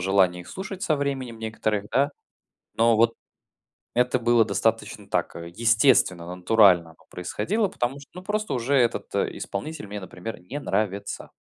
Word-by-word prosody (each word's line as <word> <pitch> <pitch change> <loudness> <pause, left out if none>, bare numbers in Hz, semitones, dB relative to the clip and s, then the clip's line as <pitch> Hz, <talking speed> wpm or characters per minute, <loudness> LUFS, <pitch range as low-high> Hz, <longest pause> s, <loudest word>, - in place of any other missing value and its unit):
желание 95 -1 +3
их - - -15
слушать 195 0 -7
со 155 -7 +2
временем 135 -5 -3
некоторых, 110 -2 -2
да. 140 +2 +2 0.7
Но 115 0 +4
вот 115 0 +4 0.8
это 125 +1 +2
было 120 -1 +4
достаточно 100 -3 -1
так, - - -1
э, 85 0 -7
естественно, 110 -6 +3
натурально 90 -3 +4
оно 80 - -21
происходило, 200 - -1
потому 135 -6 -3
что, 140 - -16
ну 180 - -8
просто 215 +2 -2
уже 130 +3 0
этот 120 -3 +1
исполнитель 105 +4 -3
мне, 105 +1 -6
например, 95 +4 -7
не 105 +11 -6
нравится. 100 -6 -2
115 Hz, 150 wpm, -25 LUFS, 100-140 Hz, 0.8 s, Но